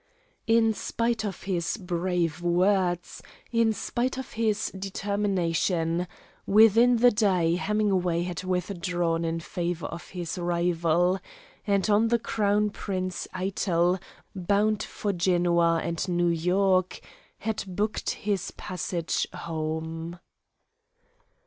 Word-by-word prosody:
In 225 -1 +4
spite 230 +1 -1
of 200 -3 -5
his 180 0 -1
brave 175 -3 -1
words, 175 0 +1 0.3
in 230 -1 +3
spite 245 +4 -2
of 265 - -6
his 220 -1 0
determination, 185 -3 -1 0.4
within 225 +4 +6
the 245 +1 +6
day 185 -6 +2
Hemingway 185 -3 +1
had 180 0 -4
withdrawn 175 -2 -1
in 165 0 -1
favor 170 -1 -3
of 170 - -7
his 175 -1 -5
rival, 175 +1 +1 0.5
and, 200 0 +2
on 215 +2 +4
the 235 +1 +3
Crown 210 -2 +1
Prince 185 -3 -4
Eitel, 185 -1 +1 0.4
bound 205 +3 +1
for 205 -1 -3
Genoa 170 -2 +2
and 170 +2 -2
New 175 0 +2
York, 185 +2 +2 0.4
had 220 -2 -3
booked 205 +4 -2 0.2
his 200 -2 0
passage 175 -1 -3
home. 160 +1 -4
185 Hz, 110 wpm, -27 LUFS, 170-205 Hz, 0.5 s, within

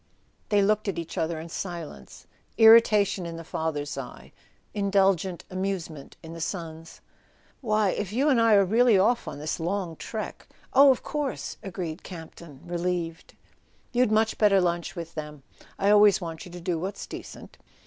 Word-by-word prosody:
They 205 -1 +3
looked 215 +1 +1
at 195 - -2
each 165 -1 -5
other 160 0 -2
in 160 - -8
silence, 165 - -7 0.3
irritation 215 -5 +6
in 165 0 -7
the 165 - -8
father's 150 -3 -3
eye, 125 -2 -10 0.4
indulgent 195 -3 +1
amusement 185 -6 -4
in 165 0 -9
the 165 - -8
son's. 165 -2 -6 0.6
"Why, 215 -4 +1
if 205 -2 -4
you 260 +7 +1
and 260 -6 +4
I 225 -2 +5
are 200 -1 +5
really 225 +2 +4
off 235 +6 +2
on - - -6
this 155 +3 -4
long 175 0 -2
trek 215 +6 -7
" - - -29
"Oh, 275 +2 +8
of 260 - +2
course," 295 -4 -4
agreed 180 -4 -5
Campton, 160 -4 -11
relieved. 175 -1 -3 0.6
"You'd 245 -2 +2
much 220 +1 +1
better 205 -2 +5
lunch 175 -1 -1
with 170 -1 -7
them. 150 -2 -7 0.3
I 200 +1 +2
always 210 -2 +6
want 165 -1 -7
you - - -12
to 175 - -8
do 170 -1 -2
what's 190 +4 -5
decent." - - -10
185 Hz, 170 wpm, -26 LUFS, 165-210 Hz, 0.6 s, Oh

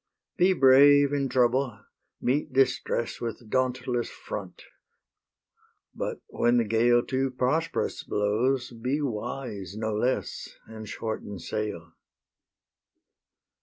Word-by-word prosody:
Be 185 +2 +4
brave 145 -1 +6
in 140 -2 0
trouble; 125 +1 +1 0.4
meet 145 +3 0
distress 130 -3 0
With 115 -1 -6
dauntless 125 -1 0
front; - - -8 1.3
but - - -4
when 120 +1 +1
the 120 - +3
gale 120 +3 +3
Too 135 0 0
prosperous 145 +6 -1
blows, 120 +5 0
be 125 +5 -2
wise 115 - -4
no 110 0 -2
less, 120 +5 -2
And 110 -1 -9
shorten 110 -2 -5
sail. 85 -4 -5
125 Hz, 100 wpm, -27 LUFS, 110-135 Hz, 1.3 s, brave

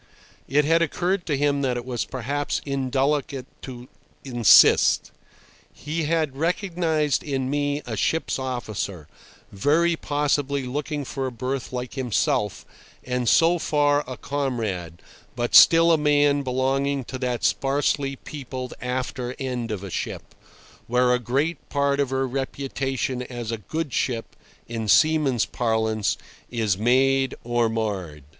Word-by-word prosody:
It 145 +2 +2
had 165 +2 +3
occurred 175 +3 -1
to 145 -4 0
him 140 0 +1
that 130 -3 0
it 120 - -5
was 125 -3 -2
perhaps 140 +3 -2
indelicate 135 0 -1 0.2
to 125 -1 -9 0.4
insist. 120 -5 +5 0.6
He 155 +2 -4
had 155 -3 0
recognised 165 -2 0
in 135 -3 -2
me 145 0 -1
a - - -4
ship's 160 -3 0
officer, 110 - -4 0.4
very 155 +11 +2
possibly 145 -2 -1
looking 145 +2 -3
for 135 +1 -3
a - - -4
berth 130 +2 -4
like 125 -1 -5
himself, 115 -5 -1 0.4
and 125 -2 -1
so 170 +1 +4
far 145 -1 +2
a 130 -1 -6
comrade, 115 - -3 0.3
but 120 -1 -2
still 165 0 +8
a 160 - +4
man 145 -1 +3
belonging 135 +1 0
to 130 +2 -7
that 125 -2 -2
sparsely 140 0 +1
peopled 130 -2 -7
after 125 0 -3
end 125 -3 -3
of 105 -3 -4
a 100 - -7
ship, - - -5 0.5
where 125 +1 +3
a 125 - +2
great 140 +7 -2
part 140 0 +1
of 140 -2 +1
her 135 0 0
reputation 135 -1 -3
as 120 -2 -5
a 115 - -2
"good 155 +6 -4
ship," 115 -3 -2 0.3
in 115 -2 -4
seaman's 150 -2 +3
parlance, 110 -3 0 0.3
is 110 -5 0
made 130 +5 +2
or 120 -1 +1
marred. 95 -10 -3
135 Hz, 135 wpm, -24 LUFS, 120-145 Hz, 0.6 s, still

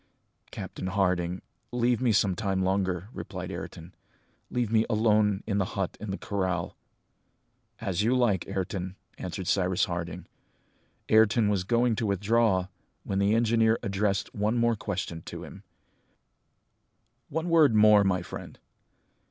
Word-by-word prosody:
"Captain 95 - -6
Harding, 90 -2 0 0.3
leave 120 0 +1
me 125 -3 +3
some 100 -3 +2
time 95 -1 -1
longer," 95 0 -1
replied - - -6
Ayrton, 85 +2 -8 0.6
"leave 120 -3 -1
me 110 -1 +4
alone 105 -2 +2
in 100 -2 0
the 100 +2 -2
hut 95 -2 -1
in 105 - -6
the 95 - -3
corral!" 95 -4 -2 1.0
"As 95 -4 -1
you 120 +4 +2
like, 105 -8 +1
Ayrton," 95 -1 -3 0.2
answered 95 +1 -5
Cyrus 95 0 +2
Harding. 85 -1 -5 0.8
Ayrton 110 0 +4
was 100 -3 +1
going 120 +3 +2
to 115 - -1
withdraw, 100 -1 +2 0.4
when 95 - -2
the 100 +2 +3
engineer 115 -1 +3
addressed 100 0 -1
one 105 +3 0
more 120 0 +2
question 95 -5 -4
to - - -7
him: - - -11 1.7
"One 160 +3 -2
word 155 -8 +5
more, 105 -1 +7
my 90 -2 +1
friend. - - -9
100 Hz, 135 wpm, -28 LUFS, 95-115 Hz, 1.7 s, more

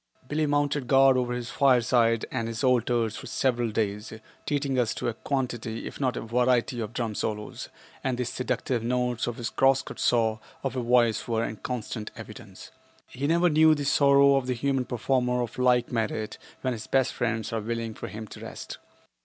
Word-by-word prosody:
Billie 150 +2 0
mounted 145 -2 0
guard 135 0 +6
over 125 -1 0
his 125 -1 -4
fireside 120 -3 +3
and 115 -3 -2
his 115 +3 -4
altars 120 -3 +2
for - - -8
several 120 -3 0
days, 105 -1 -2 0.4
treating 140 -3 0
us 115 -3 0
to - - -3
a - - -3
quantity 120 -3 -3
if - - -7
not 130 -2 0
a - - -3
variety 120 +1 +1
of 110 -2 -4
drum 115 -3 -2
solos, 105 0 -4 0.3
and 130 -2 -1
the 125 - -1
seductive 125 0 -2
notes 125 0 -1
of 120 - -3
his 115 -2 -4
cross 135 0 +3
cut - - -9
saw 110 -2 +2 0.2
of 135 -2 -2
a 130 - -1
voice 120 -2 +2
were 115 -1 0
in 110 - -4
constant 110 -1 -5
evidence. - - -11 0.3
He 140 +3 -4
never 170 +3 +3
knew 155 -1 +5
the 145 -1 -3
sorrow 140 0 +5
of 130 -2 -2
the 125 - 0
human 135 +1 0
performer 125 +1 0
of 120 +1 -7
like 125 -1 +3
merit 110 -2 -2 0.2
when 130 -1 0
his 110 -2 -7
best 135 -2 +2
friends 115 -2 -2
are 110 - -1
willing 115 0 -3
for - - -7
him 110 +1 -7
to - - -10
rest. - - -8
125 Hz, 195 wpm, -27 LUFS, 115-135 Hz, 0.4 s, guard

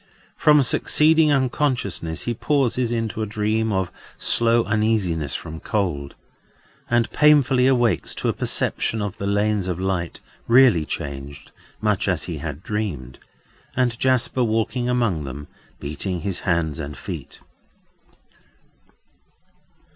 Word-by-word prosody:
From 150 -2 +5
succeeding 155 +4 +3
unconsciousness 125 - -1
he 120 - -2
passes 125 -2 0
into 115 -2 -2
a 110 - -2
dream 110 +1 -1
of 95 -2 -1 0.3
slow 115 0 +3
uneasiness 100 -9 0
from 80 0 -6
cold; 85 -11 -2 0.7
and 120 -1 +2
painfully 140 -4 +4
awakes 120 -4 +1
to - - -2
a - - +1
perception 115 - 0
of 100 -2 -4
the 100 - -3
lanes 100 -1 0
of 90 -1 -3
light—really 95 +3 +1
changed, 70 +1 -6 0.3
much 105 -2 +1
as 90 -5 0
he 80 -4 -5
had 75 +2 -6
dreamed—and 105 - -5
Jasper 130 -1 +2
walking 115 +2 -1
among 115 -11 0
them, 70 +2 -7 0.3
beating 85 +5 -4
his 95 +1 -2
hands 85 -4 -1
and 70 -3 -6
feet. - - -8
105 Hz, 115 wpm, -22 LUFS, 85-120 Hz, 0.7 s, From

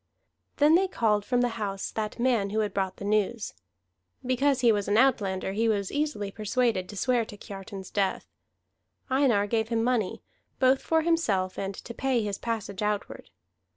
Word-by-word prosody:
Then 295 +2 +5
they 380 +3 +4
called 215 - +1
from 245 +3 +1
the 245 - +2
house 195 -1 -3
that 215 -1 -3
man 235 -5 +1
who 215 +2 0
had 205 -2 -2
brought 190 -1 -1
the 200 - -7
news. 215 +2 0 0.7
Because 260 +1 +2
he 240 -2 +6
was 205 -2 0
an 205 - +2
outlander 200 -8 +2
he 225 +3 +1
was 200 -3 0
easily 290 -10 -2
persuaded 215 -3 0
to 205 - -8
swear 245 +2 +2
to 205 - -11
Kiartan's 195 -1 -9
death. 195 -2 0 0.9
Einar 260 -7 +3
gave 220 +1 0
him 230 -1 +1
money, 235 -6 0 0.3
both 260 0 +4
for 320 -1 +1
himself 210 - +1
and 195 0 -3
to 235 - -8
pay 260 -2 0
his 205 -2 -3
passage 215 -4 -4
outward. 210 -1 -3
220 Hz, 175 wpm, -27 LUFS, 200-250 Hz, 0.9 s, he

